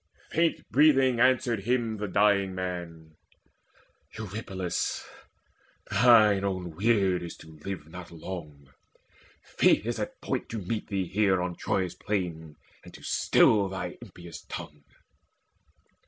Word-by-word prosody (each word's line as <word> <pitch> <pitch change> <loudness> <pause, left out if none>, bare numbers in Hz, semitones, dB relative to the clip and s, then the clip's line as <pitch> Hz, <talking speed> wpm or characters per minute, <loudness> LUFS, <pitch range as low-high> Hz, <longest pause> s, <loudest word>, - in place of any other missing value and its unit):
Faint 165 +1 +1
breathing 135 -4 +4
answered 125 -2 +3
him 115 +1 0
the 105 0 -3
dying 100 -1 +2
man: 85 -4 -6 1.0
"Eurypylus, 95 -4 -3 0.9
thine 110 -5 +6
own 95 -3 -2
weird 95 -2 +2
is 85 - -7
to 80 -1 -14
live 95 -6 -5
Not 90 +1 -10
long: 75 -5 -9 0.7
Fate - - +2
is - - -2
at - - -5
point - - -3
to 115 - -4
meet 105 +2 -3
thee 95 -3 -1
here 95 -1 +2
On 90 -1 -2
Troy's 95 -1 -1
plain, 85 -6 -4 0.3
and - - -12
to - - -14
still 100 -3 +3
thine 95 0 -5
impious 85 -2 -11
tongue." 75 -4 -7
95 Hz, 125 wpm, -28 LUFS, 85-110 Hz, 1.0 s, thine